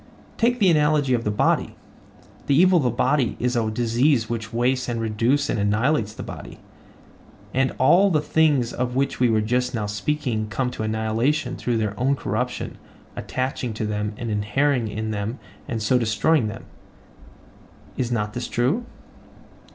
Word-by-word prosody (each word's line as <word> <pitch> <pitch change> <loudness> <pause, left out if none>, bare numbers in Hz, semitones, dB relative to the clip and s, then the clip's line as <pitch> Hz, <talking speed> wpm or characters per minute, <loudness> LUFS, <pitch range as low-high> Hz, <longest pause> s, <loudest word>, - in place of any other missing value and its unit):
Take 245 +2 +2
the 195 -6 +4
analogy 150 -3 +2
of 120 -1 0
the - - +1
body: 105 - +1 0.7
The 140 - +3
evil 185 0 +6
of 160 - +2
the - - +3
body 125 +1 +1
is 125 +1 0
a 115 -2 +1
disease 120 +2 +1
which 110 -2 -4
wastes 125 +2 0
and 120 -1 -2
reduces 115 +6 +1
and 110 - -1
annihilates 105 +3 +1
the - - -6
body; - - -9 1.0
and 130 +1 +1
all 180 +9 +5
the 155 -5 +2
things 145 -5 +2
of 125 0 -2
which 135 +1 0
we 125 -1 +4
were 110 -1 +2
just 125 +3 0
now 110 -2 -1
speaking 110 +1 -2
come 125 +3 -2
to - - -6
annihilation 115 +6 0
through 120 -2 -1
their 105 -2 -1
own 135 +3 +2
corruption - - -3 0.4
attaching 130 -3 -3
to 110 - -2
them 105 0 -2
and 115 -3 -4
inhering 115 +5 +1
in 110 +1 -4
them 105 +4 -3 0.3
and 115 -2 -3
so 125 +4 +3
destroying 115 +4 +2
them. 105 0 -7 1.3
Is 125 -2 -2
not 105 -3 -1
this 120 +1 -4
true? 150 - 0
120 Hz, 165 wpm, -23 LUFS, 110-140 Hz, 1.3 s, evil